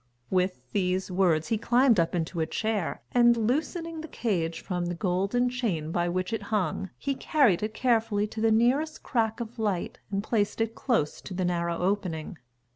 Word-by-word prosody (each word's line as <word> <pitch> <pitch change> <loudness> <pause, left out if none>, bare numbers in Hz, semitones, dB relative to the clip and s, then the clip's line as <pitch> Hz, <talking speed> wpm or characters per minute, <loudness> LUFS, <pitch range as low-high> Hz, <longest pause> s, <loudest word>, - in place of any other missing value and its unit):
With 185 0 +1
these 185 -1 0
words, 180 -3 +2
he 225 -2 +1
climbed 240 -2 +4
up 165 +1 +1
into 165 0 -2
a 160 - +1
chair 215 -1 -2
and, 240 -1 +5
loosening 315 - -1
the 320 - -7
cage 170 - -2
from 180 -2 -2
the 175 - -2
golden 195 +7 +1
chain 210 -11 -2
by 175 0 0
which 185 +5 -2
it 225 - -1
hung, 195 -2 -1
he 280 - -1
carried 265 - +3
it 215 +1 -3
carefully 225 -4 +2
to 220 +1 -6
the 225 - +4
nearest 255 +8 +2
crack 225 -3 0
of 235 0 -6
light 205 -5 -1
and 200 0 -1
placed 210 -2 0
it 225 0 0
close 230 - 0
to 185 - -7
the 185 0 0
narrow 170 -1 0
opening. 180 -3 -2
205 Hz, 185 wpm, -28 LUFS, 180-235 Hz, -, and